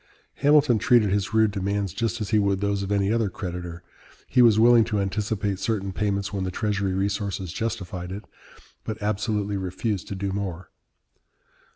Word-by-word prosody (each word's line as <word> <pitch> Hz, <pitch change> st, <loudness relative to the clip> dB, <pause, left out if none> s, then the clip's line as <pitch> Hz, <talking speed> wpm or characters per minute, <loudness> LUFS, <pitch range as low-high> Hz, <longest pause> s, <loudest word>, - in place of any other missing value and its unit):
Hamilton 145 Hz, -5 st, +4 dB
treated 110 Hz, -3 st, +4 dB
his 100 Hz, +1 st, 0 dB
rude 110 Hz, -1 st, +3 dB
demands 100 Hz, -1 st, -2 dB
just 115 Hz, 0 st, -2 dB
as 105 Hz, -, -3 dB
he 110 Hz, -, +3 dB
would 100 Hz, -1 st, +1 dB
those 100 Hz, 0 st, 0 dB
of 100 Hz, 0 st, -4 dB
any 100 Hz, +1 st, +2 dB
other 115 Hz, -3 st, +1 dB
creditor. 90 Hz, -2 st, -6 dB, 0.4 s
He 125 Hz, -, +3 dB
was 115 Hz, -3 st, +6 dB
willing 120 Hz, 0 st, +7 dB
to 105 Hz, -2 st, -1 dB
anticipate 100 Hz, 0 st, -1 dB
certain 100 Hz, -3 st, -2 dB
payments 100 Hz, 0 st, -1 dB
when 95 Hz, -2 st, -2 dB
the 95 Hz, -, -2 dB
Treasury 100 Hz, -1 st, -1 dB
resources 95 Hz, -2 st, -2 dB
justified 95 Hz, -5 st, -4 dB
it, 100 Hz, +2 st, -7 dB, 0.6 s
but 110 Hz, 0 st, -5 dB
absolutely 105 Hz, -1 st, -1 dB
refused 95 Hz, +2 st, -3 dB
to 100 Hz, -, -5 dB
do 100 Hz, 0 st, -3 dB
more. 95 Hz, -3 st, -5 dB
100 Hz, 170 wpm, -25 LUFS, 95-110 Hz, 0.6 s, willing